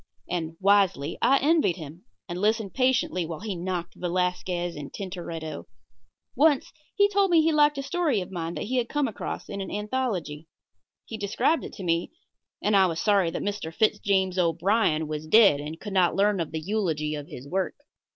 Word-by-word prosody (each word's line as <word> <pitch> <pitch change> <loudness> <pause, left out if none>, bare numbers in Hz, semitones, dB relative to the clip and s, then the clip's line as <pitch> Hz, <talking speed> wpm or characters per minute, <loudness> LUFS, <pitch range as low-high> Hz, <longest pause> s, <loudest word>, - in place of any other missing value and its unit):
And, 165 -2 -3
wisely, 190 -7 +2
I 275 - +5
envied 305 - +3
him, 165 +3 -10 0.2
and 175 0 -5
listened 215 -1 +1
patiently 255 -8 +1
while 160 0 -6
he 210 -3 -4
knocked 175 -1 -4
Velasquez 180 -1 -1
and 145 -1 -7
Tintoretto. 170 -5 -6 0.7
Once 295 -2 +3 0.2
he 405 0 +5
told 400 -1 +2
me 345 - +4
that - - +4
he 325 - +3
liked 295 -1 +4
a 275 - -3
story 295 -5 0
of 180 0 -6
mine 170 -2 -4
that - - -3
he 255 +5 -2
had 240 -2 0
come 295 -2 0
across 220 - -5
in 200 - -5
an 190 - -5
anthology. 205 - -3 0.6
He 225 - -6
described 205 +10 +1
it - - -8
to 195 - -8
me, 170 -1 0 0.5
and 210 - +2
I 190 -1 +6
was 165 -2 -3
sorry 200 -3 +3
that 165 - -4
Mr. 205 -5 -3
Fitz 215 +6 +1
James 190 -2 +1
O'Brien 170 -1 +2
was 155 0 -5
dead 200 -6 +6
and 155 +3 -6
could 205 -2 -7
not 180 -2 +3
learn 200 0 +2
of 165 - -2
the 160 - -3
eulogy 165 -8 -1
of 145 -1 -6
his 130 +3 -10
work. 185 +4 -1
190 Hz, 195 wpm, -26 LUFS, 165-220 Hz, 0.7 s, I